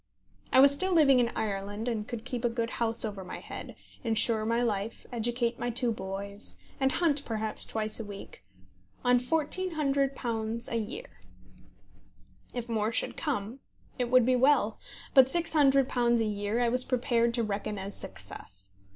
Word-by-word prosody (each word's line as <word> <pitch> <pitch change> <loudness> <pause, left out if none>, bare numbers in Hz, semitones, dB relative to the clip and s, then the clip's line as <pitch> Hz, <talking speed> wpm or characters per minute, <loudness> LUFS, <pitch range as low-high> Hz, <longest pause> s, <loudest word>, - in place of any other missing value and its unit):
I - - +6
was 275 +1 +8
still 375 +6 0
living 280 -6 +6
in 240 -1 +2
Ireland, 205 +1 -3
and 220 -3 -2
could 235 -2 -6
keep 245 -1 -4
a 240 - +3
good 230 0 -2
house 230 0 +2
over 205 -3 -4
my 180 - -7
head, - - -8 0.3
insure 225 -1 +2
my 230 +2 +1
life, 215 -1 -2
educate 240 0 0
my 245 - -1
two 240 0 0
boys, 200 0 -6 0.2
and 265 -1 +3
hunt 295 -5 +2
perhaps 220 -3 -2
twice 215 0 -1
a - - -3
week, 200 - -10 0.6
on 245 0 +5
£1400 275 -7 -1
a - - -1
year. 215 - -6 1.3
If 245 -1 -5
more 220 -1 0
should - - +1
come, 250 -5 -3 0.4
it 245 -1 0
would 255 -1 +5
be 255 +1 +3
well; 250 -4 +3 0.3
but 265 -3 +8
£600 270 -6 +3
a 225 - +1
year 205 +2 -1
I 240 - +3
was 250 +2 +2
prepared 235 -2 +1
to 235 - 0
reckon 210 0 -3
as 195 +1 -6
success. 95 +1 -8
235 Hz, 160 wpm, -29 LUFS, 215-255 Hz, 1.3 s, was